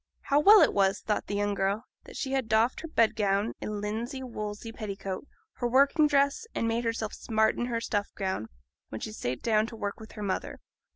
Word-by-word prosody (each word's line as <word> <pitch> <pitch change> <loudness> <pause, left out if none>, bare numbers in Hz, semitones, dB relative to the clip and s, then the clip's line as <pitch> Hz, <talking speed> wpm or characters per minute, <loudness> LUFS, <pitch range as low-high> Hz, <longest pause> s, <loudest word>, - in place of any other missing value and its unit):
How 285 - +2
well 415 +7 +8
it - - +3
was, 195 0 +2
thought 210 - -1
the 205 - -2
young 205 0 0
girl, 200 +3 0 0.2
that - - -12
she 265 - -3
had 265 -4 0
doffed 220 +3 +2
her 330 - -6
bed 230 -8 +2
gown 205 0 +1
and 210 -1 -3
linsey 230 +6 -3
woolsey 215 -2 -5
petticoat, 200 +1 -5 0.3
her 245 - -1
working 280 +5 +5
dress, 280 +9 +2
and 230 - 0
made 230 +1 0
herself 230 -2 -2
smart 220 -1 +1
in 240 - -2
her 235 -2 -1
stuff 205 -3 -1
gown, 190 - -2 0.4
when 110 - -6
she 215 - -5
sate 125 - -4
down 220 -1 +2
to 230 - -9
work 205 -1 -4
with 220 - -11
her 210 - -6
mother. 195 -2 -3
220 Hz, 215 wpm, -29 LUFS, 205-245 Hz, 0.4 s, well